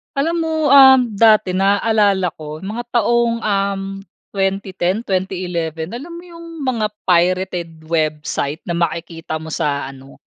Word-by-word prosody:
Alam 320 +5 0
mo, 320 - -2 0.2
um, 265 -2 +9
dati 215 -2 +4
naaalala 200 -1 +2
ko 155 +1 -8
mga 225 +5 -5
taong, 235 0 +1
um, 200 -1 0 0.5
2010, 195 +1 -1
2011 180 -4 -3
Alam 280 +9 -7
mo 340 - -10
yung 335 -1 -12 0.2
mga 235 -5 0 0.2
pirated 175 -2 0
website 155 -2 -2
na - - -5
makikita 170 -1 -3
mo 160 0 -6
sa 140 -3 -2
ano, 135 0 -15
190 Hz, 130 wpm, -18 LUFS, 165-225 Hz, 0.5 s, um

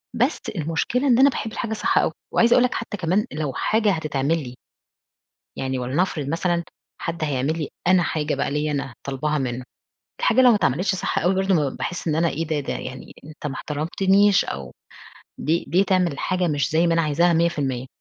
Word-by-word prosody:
بس 250 +6 +1 0.2
المُشكلة 165 - -1
إن 245 -2 +4
أنا 275 +1 +7
باحب 225 -4 -4
الحاجة 220 0 -3
صح 215 - 0
أوي. - - +3 0.2
وعايزة 235 +1 +5
أقول 250 - +5
لك 250 - +1
حتّى 230 -2 -4
كمان 185 +4 +1
لو 150 -3 -3
حاجة 215 - +1
هتتعمل 155 -1 0
لي 125 0 -9 1.0
يعني 130 0 -2
ولنفرض 140 +3 -1
مثلًا 170 +2 0 0.4
حد 165 -2 -3
هيعمل 145 +2 -1
لي 155 - -3 0.2
أنا 185 0 +5
حاجة 155 -2 -1
بقى 140 - -1
ليّا 150 +1 -1
أنا 135 -3 -3
طالباها 150 +3 -1
منّه، 125 -2 -3 0.6
الحاجة 485 - +4
لو 250 - +7
ما 225 - +5
اتعملتش 190 +2 +1
صح - - -1
أوي 180 +3 +1
برضه 190 0 +1
م 145 -4 0
باحس 180 -1 -4
إن 155 - +1
أنا 165 +2 +2
إيه 160 +2 -3
ده؟ 155 -2 0
ده 140 - -3
يعني 130 0 -7
أنت 155 0 -7
ما 135 - -4
احترمتنيش 190 +6 +2
أو 65 -2 -6 0.7
ليه 165 +3 0
ليه 185 +3 +3
تعمل 185 -5 +2
الحاجة 180 +4 -1
مش 145 -2 0
زي 165 +2 +3
ما 170 - +2
أنا 165 - +2
عايزاها 165 +3 +2
100%.؟ 145 -7 0
165 Hz, 195 wpm, -23 LUFS, 145-190 Hz, 1.0 s, أنا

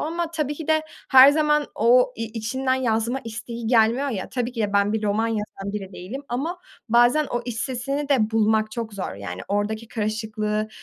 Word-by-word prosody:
ama 335 +2 -2
tabii 305 -3 -2
ki 315 +1 -8
de 315 0 +3 0.3
her 265 +1 +9
zaman 300 -1 +2
o 250 +3 +4
i 230 - -3
içinden 240 +4 -2
yazma 240 0 0
isteği 230 +1 -6
gelmiyor 235 +4 +3
ya 210 -8 -4
tabii 245 -1 -3
ki 235 - -5
de 205 - -1
ben 200 +1 +2
bir 220 - -1
roman 210 +2 +1
yazan 210 -2 -4
bile 200 -2 -5
değilim 220 +12 -7
ama 305 +9 -3 0.3
bazen 240 +6 +4
o 240 - -3
iç 240 -2 -5
sesini 275 +4 -3
de 235 -7 +2
bulmak 220 -1 +2
çok 225 -2 -5
zor. 195 - -4
Yani 95 -2 -7
oradaki 215 +2 -2
karışıklığı, 215 -1 -2
230 Hz, 190 wpm, -23 LUFS, 215-265 Hz, 0.3 s, her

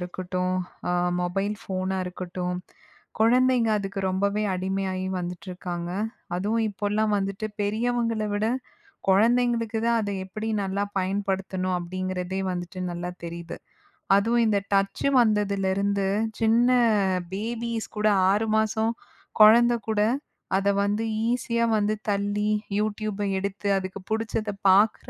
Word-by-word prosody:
இருக்கட்டும், 180 +1 -2 0.3
அ - - +1 0.3
மொபைல் 195 +4 -1
ஃபோனா 190 0 -2
இருக்கட்டும், 180 0 -4 0.6
குழந்தைங்க 245 +1 +4
அதுக்கு 195 0 -3
ரொம்பவே 200 +3 0
அடிமையாகி 190 0 -2
வந்துட்டிருக்காங்க. 180 -1 -5 0.5
அதுவும் 220 +4 0
இப்போல்லாம் 210 +1 0
வந்துட்டு 195 +2 -3
பெரியவங்கள 230 +1 0
விட 205 +1 0 0.6
குழந்தைங்களுக்கு 230 +2 +3
தான், 235 0 +3
அதை 205 -1 -2
எப்பிடி 215 +4 -5 0.2
நல்லா 195 +1 -1
பயன்படுத்தணும் 190 -1 -1
அப்பிடிங்கிறதே 185 +1 -3
வந்துட்டு 175 +1 -5
நல்லா 175 +1 -4
தெரியுது. 170 0 -6 0.6
அதுவும் 230 +3 +2
இந்த 205 -2 +3
டச்சு 195 +6 +1
வந்ததிலிருந்து 200 -2 +1 0.3
சின்ன 230 +2 +4 0.6
பேபீஸ் 230 +2 -3
கூட 210 0 +2 0.2
6 210 +3 +1
மாசம் 220 +1 +1 0.5
குழந்தை 235 +3 +7
கூட 215 -1 +2 0.6
அத 195 +1 +1
வந்து 205 +2 0 0.3
ஈஸியா 235 -1 0
வந்து 210 0 +1 0.2
தள்ளி, 205 +1 0 0.3
யூடியூப்பை 210 -1 -2
எடுத்து 200 +1 -3
அதுக்கு 190 +1 -5
பிடிச்சத 220 -1 -1 0.2
பார்க்குற 200 +3 +4
200 Hz, 110 wpm, -26 LUFS, 185-220 Hz, 0.6 s, குழந்தை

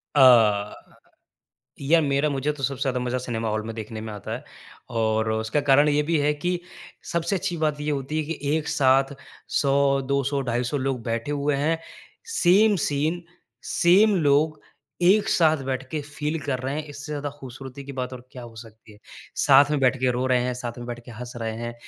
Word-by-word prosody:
अ, 110 -6 +5 1.1
यार, 160 +4 +4
मेरा 140 +1 +1
मुझे 140 +2 -1
तो 140 -2 -10
सबसे 135 0 -2
ज़्यादा 130 -2 0
मज़ा 125 +1 -1
सिनेमा 115 -3 -3
हॉल 110 0 -1
में 115 - -5
देखने 110 0 -6
में 110 -1 -6
आता 105 - -7
है - - -8 0.5
और 110 0 +1
उसका 110 +6 0
कारण 145 +1 +4
ये 150 0 +2
भी 165 +2 0
है 150 +1 +2
कि 175 +4 -2 0.5
सबसे 170 +3 0
अच्छी 180 -2 -2
बात 150 -2 -1
ये 150 +1 -2
होती 140 +2 -3
है 155 - -1
कि - - -8 0.2
एक 155 - -3
साथ 135 +1 +3 0.3
100, 140 0 +2
200, 140 +1 0
250 120 +2 -1
लोग 130 -2 -2
बैठे 115 +4 -2
हुए 145 0 0
हैं। 160 +3 0 0.6
सेम 205 +4 +5
सीन, 155 +5 -1 0.4
सेम 200 +5 +4
लोग, 150 +2 +2 0.4
एक 200 +4 +4
साथ 160 -2 +4
बैठ 130 0 -2
के 155 - -2
फ़ील 150 +2 -4
कर 135 -2 -2
रहे 135 +2 -3
हैं, 155 - -2
इससे 145 +1 -8
ज़्यादा 145 -1 -3
ख़ूबसूरती 135 +1 -9
की 140 - -8
बात 130 -1 -4
और 125 0 -9
क्या 125 - -9
हो 115 -1 -12
सकती 110 -1 -13
है। 105 - -18 0.5
साथ 140 +1 +7
में 150 - +1
बैठ 130 0 +3
के 130 -1 +2
रो 125 +1 -1
रहे 125 -1 +3
हैं, 125 0 -1
साथ 120 -1 -6
में 120 - -7
बैठ 120 0 -6
के 120 - -11
हँस 120 +2 -8
रहे 110 0 -2
हैं, 120 0 -5
135 Hz, 205 wpm, -24 LUFS, 120-150 Hz, 1.1 s, साथ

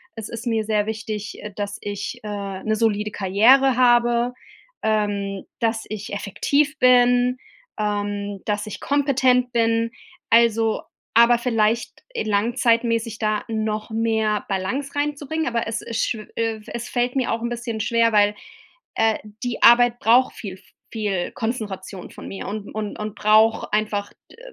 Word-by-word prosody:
es 220 -2 -7
ist 230 +1 -7
mir 225 -2 0
sehr 210 -1 0
wichtig, 215 -1 -5
äh, 210 - -6
dass 205 0 -4
ich, 205 0 -5
äh, 200 -2 -5
'ne 215 0 +1
solide 210 -2 +1
Karriere 230 +8 +4
habe, 240 0 +3 0.5
ähm, 205 -2 -1 0.2
dass 225 -1 0
ich 210 -1 -6
effektiv 285 +9 0
bin, 245 0 +4 0.4
ähm, 205 -1 -2
dass 210 0 -2
ich - - -7
kompetent 260 -3 +2
bin. 230 -1 +1 0.4
Also 225 -1 +3 0.3
aber 235 +1 +6
vielleicht 230 -1 0
e - - -1
langzeitmässig 230 +1 +1
da 215 -1 0
noch 215 -1 -2
mehr 220 -1 0
Balance 250 +10 -2
reinzubringen, 295 +2 -2
aber 235 -2 -1
es 225 0 -3
ist 230 -1 -1
schw 215 -2 -4
äh, 225 -1 -1
es 235 +1 -5
fällt 245 +1 -1
mir 255 - 0
auch 225 - -3
'n 235 - -2
bisschen 235 -2 -4
schwer, 230 0 +2
weil, 205 0 +4 0.6
äh, 225 -1 +2 0.2
die 245 -1 -3
Arbeit 240 +1 +6
braucht 250 +1 +4
viel 195 -4 -7
v - - -23 0.3
viel 205 -5 -2
Konzentration 205 -6 -5
von - - -10
mir 195 - -7
und 205 0 -6
und 215 -1 -4
und 210 -1 -5
braucht 215 +1 +3
einfach 210 -1 -1 0.2
d - - -17
225 Hz, 150 wpm, -22 LUFS, 210-240 Hz, 0.6 s, aber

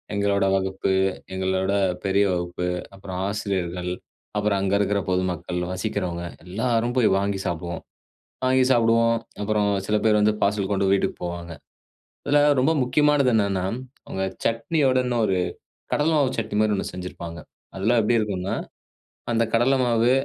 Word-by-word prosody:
எங்களோட 100 -1 +2
வகுப்பு, 95 0 0 0.4
எங்களோட 95 +1 0 0.3
பெரிய 100 +1 +3
வகுப்பு, 90 0 -3 0.3
அப்பறம் 95 -1 -6
ஆசிரியர்கள். 90 -4 -2 0.5
அப்பறம் 105 -2 +1
அங்க 100 0 0
இருக்குற 100 0 +1
பொதுமக்கள், 90 -1 -1
வசிக்கிறவங்க 90 -3 -3 0.2
எல்லாரும் 115 +5 0
போய் 120 - +4
வாங்கி 100 -1 -1
சாப்டுவோம். 85 0 -4 0.6
வாங்கி 130 0 +4
சாப்டுவோம், 115 0 +3 0.3
அப்புறம் 105 0 +1 0.2
சில 105 - +1
பேர் 105 -1 +4
வந்து, 105 0 +4
பார்சல் 100 0 0
கொண்டு 100 0 +1
வீட்டுக்கு 100 - 0
போவாங்க. 85 -1 -5 0.7
இதுல 145 0 +4 0.2
ரொம்ப 135 +5 +3
முக்கியமானது 145 0 +3
என்னென்னா, 100 -3 +1 0.4
அவங்க 95 - -3 0.2
சட்னியோட 130 +3 +2
இன்னொரு 115 -6 +1 0.6
கடல 150 +2 +2
மாவு 140 -3 +3
சட்னி 110 - -3
மாரி 110 -1 +3
ஒண்ணு - - -3
செஞ்சிருப்பாங்க. 85 -2 -7 0.4
அதெல்லாம் 110 +5 +2
எப்டி 115 +2 +2
இருக்கும்னா? 100 -3 -2 0.8
அந்த 115 0 +2
கடல 130 +3 +3
மாவு 120 0 +3
100 Hz, 135 wpm, -24 LUFS, 95-115 Hz, 0.8 s, போய்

